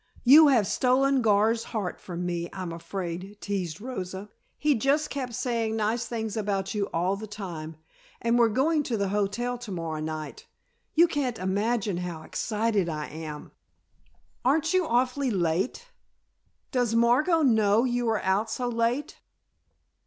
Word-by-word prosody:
You 295 Hz, +5 st, +9 dB
have 245 Hz, -7 st, +4 dB
stolen 260 Hz, +5 st, +2 dB
Gar's 220 Hz, +1 st, +3 dB
heart 205 Hz, -5 st, -4 dB
from 175 Hz, -1 st, -5 dB
me, 175 Hz, -1 st, -2 dB
I'm 185 Hz, -3 st, -5 dB
afraid," 185 Hz, +3 st, -6 dB
teased 185 Hz, -5 st, -3 dB
Rosa. 200 Hz, -4 st, -6 dB, 0.3 s
"He 300 Hz, -1 st, +3 dB
just 280 Hz, +5 st, +1 dB
kept 255 Hz, -4 st, -4 dB
saying 230 Hz, -3 st, -1 dB
nice 225 Hz, +2 st, 0 dB
things 220 Hz, -2 st, -3 dB
about 195 Hz, -3 st, -1 dB
you 205 Hz, -2 st, -1 dB
all 180 Hz, +4 st, 0 dB
the 215 Hz, +2 st, -7 dB
time. 175 Hz, -6 st, -7 dB, 0.4 s
And 235 Hz, +1 st, +2 dB
we're 235 Hz, -1 st, +5 dB
going 295 Hz, +8 st, +2 dB
to 245 Hz, -5 st, -2 dB
the 200 Hz, -1 st, 0 dB
hotel 210 Hz, +5 st, -1 dB
to 240 Hz, -4 st, -8 dB
morrow 165 Hz, -3 st, -3 dB
night. 155 Hz, -2 st, -6 dB, 0.5 s
You 340 Hz, +2 st, +6 dB
can't 275 Hz, -7 st, -2 dB
imagine 200 Hz, +1 st, 0 dB
how 175 Hz, -3 st, -5 dB
excited 215 Hz, -3 st, -1 dB
I 150 Hz, -2 st, -4 dB
am 155 Hz, -1 st, -8 dB, 0.5 s
" -, -, -38 dB
"Aren't 315 Hz, +6 st, +2 dB
you 370 Hz, -3 st, +2 dB
awfully 255 Hz, +3 st, +1 dB
late? 190 Hz, -, -1 dB, 0.8 s
Does 245 Hz, -4 st, +1 dB
Margot 260 Hz, +9 st, +4 dB
know 220 Hz, -3 st, +4 dB
you 245 Hz, -2 st, 0 dB
are 220 Hz, -2 st, 0 dB
out 195 Hz, +4 st, +1 dB
so 245 Hz, +2 st, -2 dB
late?" 240 Hz, +5 st, -1 dB
220 Hz, 150 wpm, -27 LUFS, 190-245 Hz, 0.8 s, You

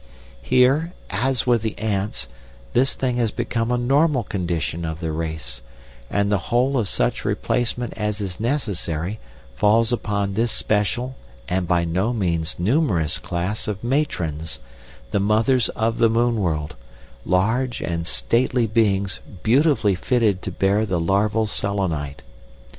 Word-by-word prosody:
Here, 135 Hz, -, +3 dB, 0.2 s
as 125 Hz, +7 st, +1 dB
with 120 Hz, -3 st, +3 dB
the 110 Hz, -1 st, -3 dB
ants, 100 Hz, -, -2 dB, 0.5 s
this 130 Hz, +2 st, +2 dB
thing 125 Hz, -2 st, -1 dB
has 120 Hz, -2 st, +2 dB
become 115 Hz, 0 st, -2 dB
a 125 Hz, -, +2 dB
normal 135 Hz, +2 st, +2 dB
condition 85 Hz, -4 st, -2 dB
of 80 Hz, 0 st, -4 dB
the 80 Hz, -2 st, -2 dB
race, 80 Hz, -6 st, -4 dB, 0.5 s
and 100 Hz, 0 st, +1 dB
the 100 Hz, -, +3 dB
whole 125 Hz, +4 st, +2 dB
of 105 Hz, -5 st, -1 dB
such -, -, 0 dB
replacement 120 Hz, 0 st, -1 dB
as 105 Hz, -1 st, -2 dB
is 95 Hz, -3 st, -4 dB
necessary 105 Hz, -, -2 dB, 0.3 s
falls 110 Hz, -, +3 dB
upon 100 Hz, -3 st, -1 dB
this 115 Hz, +3 st, +1 dB
special 120 Hz, +5 st, 0 dB, 0.3 s
and 90 Hz, -1 st, -1 dB
by 85 Hz, -1 st, +2 dB
no 95 Hz, +8 st, 0 dB
means 85 Hz, -7 st, -1 dB
numerous 95 Hz, -, +1 dB
class 90 Hz, +5 st, -3 dB
of 105 Hz, -1 st, -4 dB
matrons, 85 Hz, -, -1 dB, 0.5 s
the 100 Hz, -, +1 dB
mothers 110 Hz, +5 st, +3 dB
of 115 Hz, +1 st, 0 dB
the 115 Hz, -1 st, +5 dB
moon 115 Hz, +1 st, +2 dB
world, 75 Hz, -5 st, -1 dB, 0.5 s
large 115 Hz, -, +1 dB
and 85 Hz, -1 st, -3 dB
stately 120 Hz, +4 st, +1 dB
beings 100 Hz, -3 st, +1 dB, 0.2 s
beautifully 130 Hz, -3 st, +3 dB
fitted 105 Hz, -1 st, +1 dB
to 95 Hz, -, -4 dB
bear 100 Hz, +4 st, +2 dB
the 95 Hz, -5 st, 0 dB
larval 105 Hz, +6 st, +2 dB
Selenite. 95 Hz, -, -2 dB
105 Hz, 140 wpm, -22 LUFS, 90-120 Hz, 0.5 s, the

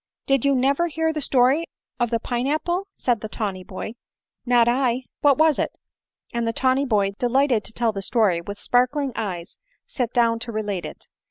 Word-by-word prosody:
Did 275 Hz, -3 st, +2 dB
you 280 Hz, -1 st, +3 dB
never 275 Hz, +6 st, +2 dB
hear 320 Hz, 0 st, -1 dB
the 305 Hz, -, -3 dB
story 265 Hz, +4 st, +3 dB, 0.4 s
of 240 Hz, -1 st, +1 dB
the 230 Hz, -1 st, 0 dB
pine 245 Hz, +2 st, -2 dB
apple 345 Hz, +6 st, -1 dB
?" -, -, -62 dB
said 240 Hz, -4 st, 0 dB
the 215 Hz, -, -5 dB
tawny 195 Hz, -3 st, -3 dB
boy. 185 Hz, +4 st, -6 dB, 0.3 s
" -, -, -60 dB
Not 240 Hz, -1 st, +4 dB
I. 250 Hz, 0 st, +1 dB, 0.2 s
What 285 Hz, -2 st, +4 dB
was 315 Hz, -2 st, +4 dB
it -, -, -1 dB, 0.3 s
?" -, -, -39 dB
and 235 Hz, -1 st, -1 dB
the 230 Hz, -, 0 dB
tawny 260 Hz, +3 st, +2 dB
boy, 205 Hz, -5 st, +2 dB
delighted 250 Hz, -2 st, +2 dB
to -, -, -4 dB
tell 230 Hz, 0 st, +1 dB
the 200 Hz, -2 st, -5 dB
story, 195 Hz, -5 st, +2 dB
with 200 Hz, +4 st, -7 dB
sparkling 255 Hz, +3 st, +1 dB
eyes 185 Hz, -6 st, -5 dB, 0.3 s
sat 245 Hz, -3 st, -3 dB
down 230 Hz, -1 st, +2 dB
to 235 Hz, 0 st, -6 dB
relate 205 Hz, -4 st, -3 dB
it. -, -, -12 dB
245 Hz, 205 wpm, -23 LUFS, 220-275 Hz, 0.4 s, Not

